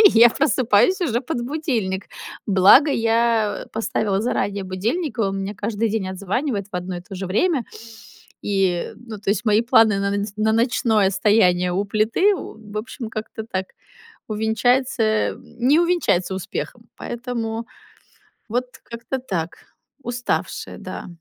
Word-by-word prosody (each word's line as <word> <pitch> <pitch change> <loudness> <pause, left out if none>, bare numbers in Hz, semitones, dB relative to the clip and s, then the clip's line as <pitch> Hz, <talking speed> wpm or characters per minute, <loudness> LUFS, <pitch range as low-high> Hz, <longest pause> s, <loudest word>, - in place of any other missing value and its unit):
и 410 -3 +8
я 235 +1 +9
просыпаюсь 260 - +3
уже 245 -9 0
под 250 -2 -3
будильник. 240 - -2 0.4
Благо, 200 +10 +6
я 230 -3 +1
поставила 215 -3 -1
заранее 205 -3 -1
будильник, 230 - -2
и - - +2
он 195 -2 0
мне 195 +2 -4
каждый 215 +2 -1
день 205 -3 -1
отзванивает 200 +4 -2
в - - -2
одно 180 0 -4
и - - -6
то 190 +3 -11
же 190 +1 -4
время. 255 - +1 0.8
И, 190 -4 0
ну, 225 -3 -9
то 200 0 -2
есть, 200 +1 -1
мои 215 +1 +4
планы 225 -4 +4
на 200 0 0
нац 200 0 -2
на 215 +1 +2
ночное 225 -3 +2
стояние 185 -3 +3
у 195 +3 0
плиты, 220 - +2
в 215 - -9
общем, 240 +1 -6
как-то 220 0 -6
так 190 -4 -3 0.6
увенчается, 225 +4 +1 0.3
м, - - -11 0.2
не 270 +7 +4
увенчается 340 - +1
успехом. 190 - -5
Поэтому 235 -2 -4 0.8
вот 245 +3 0 0.2
как-то 235 +3 -5
так. 175 -10 -4 0.5
Уставшая, 245 0 -3
да. - - -7
220 Hz, 145 wpm, -22 LUFS, 195-245 Hz, 0.8 s, я